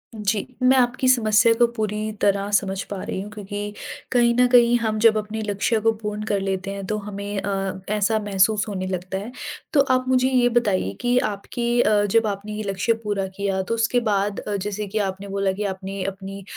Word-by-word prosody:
जी। 210 0 -1 0.2
मैं 260 +1 +5
आपकी 255 +1 +2
समस्या 230 -2 +5
को 240 +1 +4
पूरी 215 0 -2
तरह 200 0 +2
समझ 195 -1 +1
पा 195 - -4
रही - - -4
हूँ 205 - -7
क्योंकि 205 0 -6 0.4
कहीं 240 -1 +4
न 250 - +6
कहीं 240 -1 +6
हम 215 -2 -1
जब 220 -1 +5
अपने 215 +1 -3
लक्ष्य 205 +3 +1
को 225 +1 +3
पूर्ण 210 0 -4
कर 200 - +2
लेते 195 0 -2
हैं 200 -1 -5
तो 215 - -1
हमें 205 0 -5
अ, 195 -1 -2
ऐसा 215 +1 +1
महसूस 205 +1 +2
होने 185 -2 -3
लगता 185 +1 -3
है। 210 +5 -6 0.4
तो 280 - +6
आप 255 0 +2
मुझे 260 0 +3
ये 245 -2 +3
बताइए 185 - +1
कि 245 0 +2
आपकी 235 +4 -2
अ, 210 -1 +3
जब 225 +2 +2
आपने 205 +1 -4
ये 215 0 -4
लक्ष्य 195 +4 +1
पूरा 200 -2 -1
किया 195 -1 0
तो 230 +5 -2
उसके 230 +2 +2
बाद 200 0 0
अ, 205 - -4
जैसे 205 +1 -3
कि 215 +3 -4
आपने 195 +1 -8
बोला 195 -1 0
कि 205 +2 -4
आपने 195 0 -6
अपनी 195 0 -6
210 Hz, 205 wpm, -23 LUFS, 195-225 Hz, 0.4 s, न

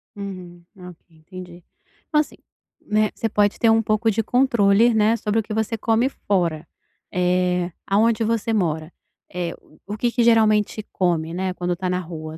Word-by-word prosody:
Uhum, 185 -3 -8
ok, 180 -2 -11 0.2
entendi. 175 +1 -12 0.4
Então, 300 - +2
assim, 300 - -2 0.5
né, 215 0 +1
você 225 - -2
pode 205 -1 +1
ter 230 - +4
um 225 0 +4
pouco 215 +1 +1
de 220 +1 0
controle, 235 -2 +3
né, 220 +1 +3
sobre 220 0 -1
o - - -1
que 215 - -6
você 220 +1 -1
come 230 +4 +1
fora. 170 - -2 0.5
Eh, 180 -1 +1 0.2
aonde 225 +3 +2
você 225 0 -1
mora, 160 -5 -1 0.4
eh, 175 -2 -3 0.3
o 210 - -5
que 235 +2 0
que 240 0 +1
geralmente 215 -2 +3
come, 170 -3 -1
né, 185 0 -2
quando 175 -1 -2
tá 185 +1 -3
na 180 0 0
rua? 160 -2 -8
200 Hz, 170 wpm, -22 LUFS, 180-225 Hz, 0.5 s, ter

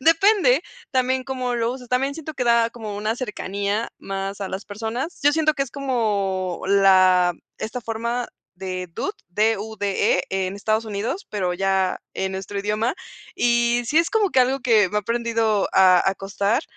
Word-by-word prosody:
depende 390 - +4 0.3
también 255 0 +1
cómo 255 -2 -2
lo 230 0 0
uses 250 -2 -10
también 270 +3 0
siento 315 -1 -7
que 250 - -2
da 235 -1 +3
como 215 -4 -7
una 215 +2 -1
cercanía 205 -2 -3
más 195 +1 -5
a 195 - -3
las 190 +2 -5
personas. 225 - -4
Yo 290 +1 +5
siento 310 0 +2
que 275 - 0
es 245 - -13
como 200 -9 -1
la 185 -2 +5 0.2
esta 225 +3 -4
forma 235 +2 -3 0.3
de 185 -1 -5
dude - - -2 0.2
D-U-D-E 205 -2 0
en 190 0 -2
Estados 215 +2 0
Unidos, 220 - -3
pero 185 -4 -1
ya 190 0 0
en 190 0 -2
nuestro 195 +1 -5
idioma. 215 +5 0 0.4
Y 240 0 +2
sí 305 +7 +3
es 335 - +2
como 425 -4 +2
que 260 - +4
algo 265 +2 +2
que 225 -6 +4
me 210 - +1
aprendido 230 -1 0
a 185 -1 +5
a - - -4
costar 200 +7 -1
220 Hz, 170 wpm, -23 LUFS, 195-250 Hz, 0.4 s, Yo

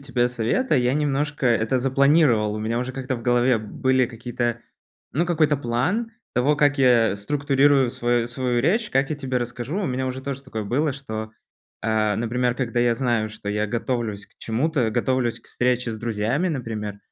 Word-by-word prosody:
тебя 125 -3 0
совета, 125 - 0
я 125 0 +2
немножко 145 -1 0
это 115 +1 +2
запланировал. 135 -4 +3
У - - -3
меня 110 +2 -1
уже 125 +1 -3
как-то 130 0 -3
в 115 - -9
голове 120 0 +3
были 130 +4 +1
какие-то, 120 0 -3 0.5
ну, 165 +5 +1
какой-то 155 -4 +2
план 160 - -1 0.2
того, 140 +4 +2
как 145 -1 +3
я 120 -6 +4
структурирую 140 +3 +2
свою 120 -1 0
свою 125 0 -1
речь, 210 - +1
как 135 +2 +1
я 155 - -1
тебе 135 -3 -3
расскажу. 120 - -4
У - - -1
меня 130 0 -2
уже 130 +1 -4
тоже 140 0 -5
такое 110 -5 -5
было, 140 +7 0
что, 110 -5 -6 0.5
а, 110 -2 +1
например, 120 +2 0
когда 120 -2 -1
я 120 -1 +3
знаю, 115 -3 0
что 105 -1 -8
я 105 +1 0
готовлюсь 115 -2 -3
к - - -32
чему-то, 125 +1 0
готовлюсь 120 +1 0
к - - -23
встрече 125 -1 0
с 110 - -6
друзьями, 115 - -1
например, 110 -8 -4
125 Hz, 180 wpm, -23 LUFS, 115-140 Hz, 0.5 s, я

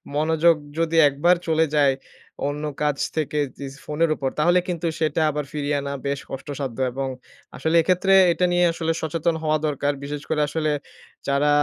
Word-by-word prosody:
মনোযোগ 160 +2 +3 0.2
যদি 165 0 0
একবার 150 +6 +3
চলে 160 0 +3
যায় 140 -2 +4 0.5
অন্য 145 +1 -4 0.2
কাজ 150 -2 +1 0.2
থেকে 150 -1 -1 0.2
যে 140 - -6 0.2
ফোনের 155 +2 +1
উপর 135 -3 -2
তাহলে 175 +4 +4
কিন্তু 175 -2 -2
সেটা 155 0 +1
আবার 150 -1 -3
ফিরিয়ে 145 -1 -1
আনা 140 0 -4
বেশ 140 0 -1
কষ্টসাধ্য 135 -2 -5
এবং 135 +1 -3 0.5
আসলে 160 +1 0
এক্ষেত্রে 185 +3 +2 0.2
এটা 180 - +1
নিয়ে 175 0 +3
আসলে 165 0 -1
সচেতন 160 +1 0
হওয়া 155 0 +2
দরকার। 145 0 0
বিশেষ 145 +1 -5
করে 150 -1 +1
আসলে 155 +1 -1 0.6
যারা 140 +1 +2
150 Hz, 165 wpm, -23 LUFS, 145-165 Hz, 0.6 s, যায়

